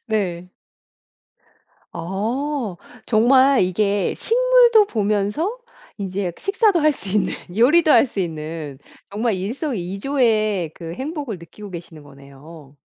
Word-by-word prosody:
네. 180 -5 -2 1.5
아. 220 - -3 0.3
정말 260 +4 +4
이게 200 +2 0
식물도 480 -3 +4
보면서 215 - -1 0.4
인제 190 -2 -3
식사도 395 -2 +2
할 305 0 +4
수 200 - -9
있는 - - 0 0.2
요리도 305 +7 +4
할 - - +6
수 210 - -6
있는 155 -4 -6 0.3
정말 220 +2 0
일석이조의 215 - -1
그 165 -1 -8
행복을 275 - -5
느끼고 195 +5 -12
계시는 165 -3 -10
거네요. 140 +1 -15
210 Hz, 225 characters per minute, -21 LUFS, 175-275 Hz, 1.5 s, 할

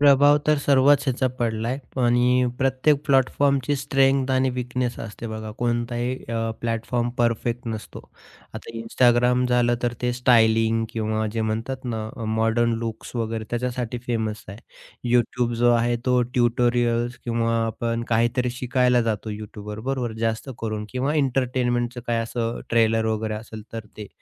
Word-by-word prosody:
प्रभाव 145 +1 +6
तर 150 -1 +4
सर्वच 140 0 +4
ह्याचा 130 0 +1
पडला 115 -1 -1
आहे. 130 +2 -2 0.3
आणि 125 +1 +3
प्रत्येक 135 +3 +3
प्लॅटफॉर्मची 140 0 +2
स्ट्रेंग्थ 135 0 +2
आणि 130 0 +2
वीकनेस 125 0 -3
असते 115 +1 -7
बघा. 110 -1 -6
कोणताही 120 +1 -1
अ, 115 -1 -1
प्लॅटफॉर्म 115 +1 -1
परफेक्ट 120 0 0
नसतो. 110 -1 -6 0.5
आता - - -8
Instagram 125 +2 +3
झालं 120 -1 +3
तर 120 -1 +1
ते 125 0 +1
स्टायलिंग 115 -2 +3
किंवा 110 -1 -1
जे 115 - -2
म्हणतात 115 +5 -3
ना 110 -3 -3
अ, 115 - -5
मॉडर्न 115 +2 +1
लुक्स 115 +1 -6
वगैरे 115 -1 -2
त्याच्यासाठी 125 0 -2
फेमस 110 -3 -2
आहे. 100 +2 -8 0.6
YouTube 120 0 +1
जो 120 +1 +3
आहे 120 0 +2
तो 125 -1 +4
ट्युटोरियल्स 120 0 +1
किंवा 115 -1 0
आपण 115 +1 -2
काहीतरी 120 +2 +1
शिकायला 125 0 +2
जातो 110 -1 -2
YouTubeवर. 105 0 -7
बरोबर, 130 -4 -2
जास्त 115 +4 -3
करून 110 -1 -3
किंवा 130 +4 -1
एंटरटेनमेंटचं 125 -3 0
काही 120 -1 +1
असं 115 0 -2
अ, - - -8
ट्रेलर 115 -1 +3
वगैरे 110 0 -1
असेल 110 0 -8
तर 110 -2 -6
ते. 105 -1 -7
120 Hz, 150 wpm, -24 LUFS, 115-125 Hz, 0.6 s, प्रभाव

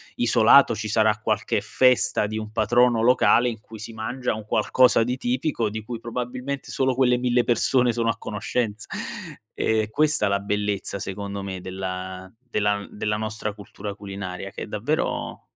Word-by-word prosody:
isolato 120 +3 +5
ci 110 0 -4
sarà 110 0 +3
qualche 110 -1 0
festa 125 0 +3
di 110 +1 -4
un 110 -1 -5
patrono 120 +2 +3
locale 125 0 +4
in 115 -2 -6
cui 110 0 -12
si 110 - -7
mangia 125 +3 -3
un 110 -1 -8
qualcosa 115 +2 +3
di 125 +2 -2
tipico, 125 -2 -1
di 110 +1 -4
cui 115 +1 -6
probabilmente 125 +4 -5
solo 130 -1 +1
quelle 125 -1 +3
1000 125 0 +2
persone 125 +1 +2
sono 115 0 0
a 115 - -1
conoscenza. 110 0 -3 0.7
È 110 -1 0
questa 150 -3 +2
la 100 0 +1
bellezza 100 -1 -2
secondo 100 +1 -5
me 95 -1 -5
della 95 0 -6
della 105 -5 0
n 100 - -9
della 105 0 -1
nostra 110 -1 -3
cultura 100 0 -8
culinaria, 95 -1 -7
che - - -6
è - - -7
davvero - - -2
110 Hz, 165 wpm, -24 LUFS, 105-125 Hz, 0.7 s, isolato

